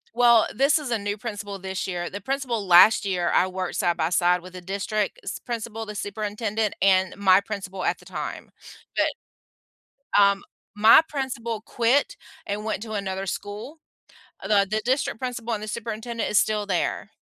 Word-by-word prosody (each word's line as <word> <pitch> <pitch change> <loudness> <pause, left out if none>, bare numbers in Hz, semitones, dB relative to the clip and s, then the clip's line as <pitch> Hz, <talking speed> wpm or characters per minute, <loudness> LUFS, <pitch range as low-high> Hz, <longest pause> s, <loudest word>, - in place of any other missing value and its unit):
Well, 235 -2 +6
this 275 +4 +3
is 290 -5 -5
a 230 - +1
new 205 +1 -3
principal 205 -3 -6
this 190 0 -4
year. 175 -2 -3
The 200 0 -7
principal 245 -5 -2
last 180 +6 +7
year, 180 -3 0
I 185 - +4
worked 185 -1 -4
side 175 -3 +1
by 160 0 0
side 180 0 +3
with 185 +1 -12
the 180 - -8
district 200 - -2
s - - -5
principal, 225 -2 -5
the 210 - -7
superintendent, 210 +1 -2
and 190 -1 +3
my 190 -1 +5
principal 195 -3 -6
at - - 0
the - - -19
time, - - -6 0.4
but, - - -1 0.9
um, 200 0 +3 0.3
my 220 +6 +8
principal 245 -6 -3
quit 255 - +1 0.3
and 205 +1 -3
went 220 -1 -3
to 220 -1 -7
another 195 -2 -3
school. 205 - -6 0.6
The 200 -2 +3
the 215 +2 0
district 255 -2 0
principal 240 -2 -3
and 210 - -5
the 215 - -6
superintendent 230 +1 -4
is 210 - +4
still 210 -1 +1
there. 185 -4 -1
210 Hz, 175 wpm, -24 LUFS, 195-230 Hz, 0.9 s, my